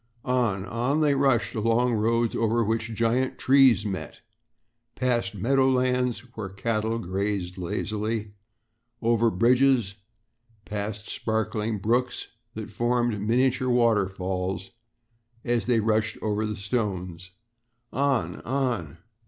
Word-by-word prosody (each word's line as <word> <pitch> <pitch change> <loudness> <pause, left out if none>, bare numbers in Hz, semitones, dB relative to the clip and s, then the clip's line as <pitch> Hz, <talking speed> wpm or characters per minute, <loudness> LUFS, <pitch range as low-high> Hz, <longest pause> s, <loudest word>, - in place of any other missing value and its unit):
On, 120 -7 0
on 125 +8 0
they 150 -2 +4
rushed 135 -4 +2
along 115 +3 +2
roads 115 +1 +1
over 115 +1 +2
which 115 +1 -1
giant 115 +4 +1
trees 130 -5 +5
met, 95 -3 -5 0.7
past 120 -6 0
meadow 130 +6 +2
lands 125 -1 +1
where 105 -3 -5
cattle 110 +3 -1
grazed 95 -2 -2
lazily, 105 +4 -3 0.7
over 115 0 +3
bridges, 120 0 +3 0.7
past 105 0 -5
sparkling 110 0 -2
brooks 120 +5 -1 0.3
that - - -6
formed 120 -3 0
miniature 130 +4 +1
waterfalls 95 -5 0 0.7
as 120 -3 0
they 120 -2 +3
rushed 110 0 0
over 110 0 0
the 105 - -3
stones 95 -5 -3 0.6
on, 140 -2 0
on! 120 - -2
115 Hz, 110 wpm, -26 LUFS, 105-125 Hz, 0.7 s, trees